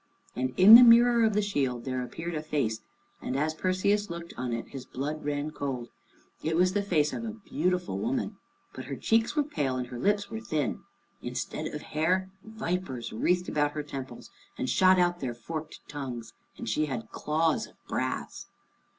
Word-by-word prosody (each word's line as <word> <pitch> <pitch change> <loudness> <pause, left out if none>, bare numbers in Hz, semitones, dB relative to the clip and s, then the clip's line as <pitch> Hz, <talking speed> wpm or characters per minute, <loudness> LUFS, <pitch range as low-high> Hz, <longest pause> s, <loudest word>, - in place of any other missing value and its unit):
And 130 0 -2
in 195 +4 +9
the 235 - +13
mirror 235 0 +7
of 220 -1 +3
the 210 - +2
shield 135 -11 -1
there 130 -1 -2
appeared 165 +7 -5
a 155 - -2
face, 140 -8 -1 0.4
and 130 - -3
as 155 +2 0
Perseus 185 +4 +1
looked 170 0 -7
on 125 -1 -3
it 115 0 -4
his 135 -2 -7
blood 150 +5 -4
ran 145 +1 -2
cold. 130 -5 -4 0.5
It 160 +1 -1
was 180 +2 +3
the 205 - +1
face 155 -7 +1
of 230 - -4
a 230 - -3 0.2
beautiful 180 0 -1
woman, 235 -4 -2 0.4
but - - -7
her - - -4
cheeks 225 +4 +1
were 300 - +3
pale, 145 - -2
and 125 -1 -2
her 125 - -6
lips 205 +6 +1
were 220 - -4
thin. 155 - -2 0.4
Instead - - -4
of - - -6
hair, 185 +5 0
vipers 180 - -4
wreathed 180 +10 +1
about 145 -1 +1
her 150 - -3
temples 135 -2 -8 0.3
and - - -2
shot 185 +6 +5
out 175 -1 +2
their 125 -3 -3
forked 155 +6 -7
tongues, 125 -6 -6 0.2
and - - -7
she 150 +8 +1
had 120 -5 -5
claws 160 +1 0
of - - -21
brass. - - -3
155 Hz, 185 wpm, -28 LUFS, 135-190 Hz, 0.5 s, the